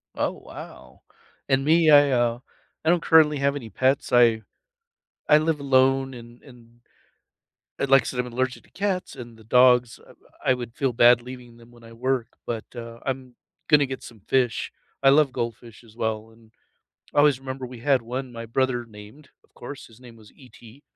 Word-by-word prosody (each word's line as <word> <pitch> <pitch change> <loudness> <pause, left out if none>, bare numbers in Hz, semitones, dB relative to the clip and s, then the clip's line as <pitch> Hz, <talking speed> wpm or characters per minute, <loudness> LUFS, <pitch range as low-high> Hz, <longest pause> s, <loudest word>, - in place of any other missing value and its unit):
Oh - - -1
wow, - - -12 0.5
and 135 0 +2
me, 160 +1 +4
I 145 -1 +6
uh, 120 -1 +1 0.5
I - - +3
don't 175 -1 +3
currently 155 -3 +5
have 140 +1 +1
any 115 -6 -7
pets. 130 +7 0
I 115 -2 +4 0.9
I 150 - +6
live 155 0 0
alone 135 -1 +2
and 120 0 -13
and 120 -4 -17 1.1
and 140 - -2
like 135 0 +6
I - - -15
said, 125 - -4
I'm 125 - -1
allergic 125 +1 -3
to - - -26
cats 190 -4 -3
and 120 -2 -10
the 110 - -17
dogs, 125 0 +3 0.4
I - - +2
I - - +5
would 120 -2 -7
feel 135 -3 -1
bad 120 +1 +5
leaving 125 -1 -11
them 120 0 -18
when 120 -1 -19
I 115 - -14
work, 125 0 -1 0.2
but, 115 -2 -3
uh, 115 0 -9
I'm 130 -2 -5 0.3
gonna 150 -2 +5
get 130 0 -7
some 110 -3 -13
fish. 125 -3 0 0.3
I 135 - +7
love 140 0 +4
goldfish 115 -1 -6
as 110 -2 -18
well 110 -1 -3
and 110 -1 -22 0.6
I - - 0
always 145 -3 +4
remember 130 0 -6
we 125 -1 -11
had 135 -1 +2
one 125 +2 -6
my 115 -1 -7
brother 125 +1 -1
named, 110 +6 -15 0.2
of - - -33
course, 135 +3 -10
his 115 -1 -19
name 120 -2 -14
was 110 -2 -18
ET 125 0 -17
125 Hz, 190 wpm, -24 LUFS, 115-135 Hz, 1.1 s, I